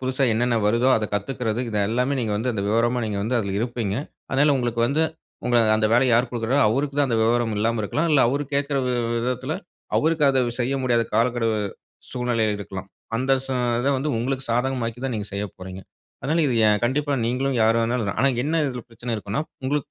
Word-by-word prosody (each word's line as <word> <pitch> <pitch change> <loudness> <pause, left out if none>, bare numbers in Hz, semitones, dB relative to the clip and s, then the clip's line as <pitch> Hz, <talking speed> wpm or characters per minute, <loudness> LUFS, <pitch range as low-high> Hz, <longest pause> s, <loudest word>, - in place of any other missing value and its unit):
புதுசா 130 +1 -1
என்னென்ன 120 +1 +1
வருதோ, 115 +4 +3
அத 110 - -1
கத்துக்கறது, 110 +2 -2
இது 105 - -1
எல்லாமே, 125 +5 0
நீங்க 110 -3 -1
வந்து 120 +4 -1
அந்த 100 -3 -2
விவரமா, 120 +3 +2
நீங்க 105 -2 -2
வந்து 120 +3 0
அதில 100 -3 -2
இருப்பீங்க. 115 -4 -2 0.4
அதனால 145 +2 +3
உங்களுக்கு 120 -2 -1
வந்து, 150 +5 +1 0.4
உங்க 120 -1 +2 0.2
அந்த 110 0 +2
வேலைய 125 +1 +4
யார் 120 +2 +3
கொடுக்கிறாங்களோ 120 +1 +1
அவருக்கு 140 +5 -1
தான் 140 -2 +3
அந்த 115 -2 +1
விவரம் 115 -1 +1
இல்லாம 115 +1 +1
இருக்கலாம். 155 +11 0
இல்ல 145 -3 +5
அவர் 140 +4 0
கேட்கிற 140 0 0
வி 125 - 0
வி - - -3
விதத்துல 125 +4 -2 0.4
அவருக்கு 160 -1 +2
அத 135 -1 +2 0.2
செய்ய 130 +3 0
முடியாத 120 -2 +2
காலக்கெடு, 115 0 +2 0.6
சூழ்நிலை 125 -3 0
இருக்கலாம். 95 -1 -7 0.3
அந்த 130 +3 +1
சூ 135 - -3 0.3
இத 135 - 0
வந்து 145 +3 -1
உங்களுக்கு 135 +3 -2
சாதகமாக்கி 120 -1 -1
தான், 130 -3 -1
நீங்க 105 -1 -5
செய்ய 100 +1 -2
போறீங்க. 95 +1 -8 0.4
அதனால 160 +5 +1
இது 125 - 0
எ 105 - +5
கண்டிப்பா 145 +3 0
நீங்களும், 130 +2 0
யார் 115 +1 +4
வேண்னாலும் 115 -3 -1
ஆனா 140 - +4 0.2
என்ன 160 +1 +1
இதில 125 -3 -4
பிரச்சனை 115 +1 -4
இருக்கும்ன்னா, 105 +7 -3 0.2
உங்களுக்கு 145 +1 -1
120 Hz, 195 wpm, -23 LUFS, 115-135 Hz, 0.6 s, இல்ல